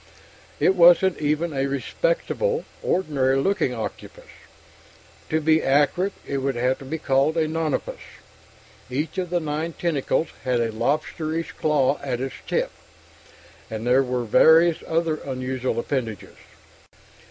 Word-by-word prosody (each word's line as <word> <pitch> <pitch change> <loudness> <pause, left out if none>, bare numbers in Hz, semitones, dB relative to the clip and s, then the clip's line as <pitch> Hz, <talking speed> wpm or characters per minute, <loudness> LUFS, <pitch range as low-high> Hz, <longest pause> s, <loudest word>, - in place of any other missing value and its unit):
It 190 - +4
wasn't 175 +1 +5
even 155 +2 0
a 135 0 0
respectable, - - -1 0.2
ordinary 135 -7 +1
looking 135 -2 +1
octopus. 110 - -7 1.0
To 160 - +1
be 160 0 +3
accurate, 150 +8 +2
it 140 - -2
would 135 -1 -1
have 125 +2 0
to 135 - -10
be 155 +5 -3
called 140 +2 +1
a 160 -1 +2
nonapus; 160 -1 -2 0.9
each 150 +8 -3
of 180 -2 -3
the 175 0 +1
nine 155 +1 -3
tentacles 160 -1 -1
had 125 -2 +1
a 115 -1 0
lobsterish 155 +7 -2
claw 145 -2 +1
at 130 -4 -3
its 135 0 -4
tip, - - 0 1.0
and 110 +1 -5
there 125 +2 +4
were 125 -2 -2
various 160 +8 +5
other 165 -1 0
unusual 130 -2 -3
appendages. 115 -5 -4
150 Hz, 130 wpm, -23 LUFS, 130-165 Hz, 1.0 s, wasn't